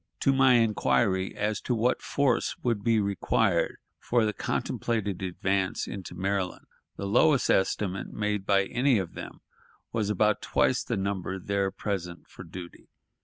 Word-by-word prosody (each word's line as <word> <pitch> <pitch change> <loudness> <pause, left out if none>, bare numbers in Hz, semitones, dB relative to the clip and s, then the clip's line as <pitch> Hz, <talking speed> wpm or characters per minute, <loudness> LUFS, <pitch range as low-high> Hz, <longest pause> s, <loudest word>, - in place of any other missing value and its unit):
To 135 - +4
my 135 -1 +5
inquiry 105 -4 +2
as 105 0 -1
to 125 - -1
what 120 +3 +1
force 140 -4 +1
would 115 -5 0
be 115 -1 +3
required 100 -2 +1 0.2
for 120 -2 +1
the 105 - 0
contemplated 105 -5 -2
advance 95 +1 -1
into 95 -2 -7
Maryland, 95 -1 -2 0.3
the 100 - -5
lowest 135 +7 +3
estimate 95 0 0
made 105 -2 -1
by 100 -1 +3
any 125 +5 +2
of 95 -4 -3
them - - -9 0.5
was 110 -3 -1
about 105 +1 +2
twice 130 - +1
the 115 - -2
number 95 -1 -2
there 100 +1 -1
present 90 -4 -5
for - - -11
duty. 85 0 -10
100 Hz, 150 wpm, -28 LUFS, 95-115 Hz, 0.5 s, my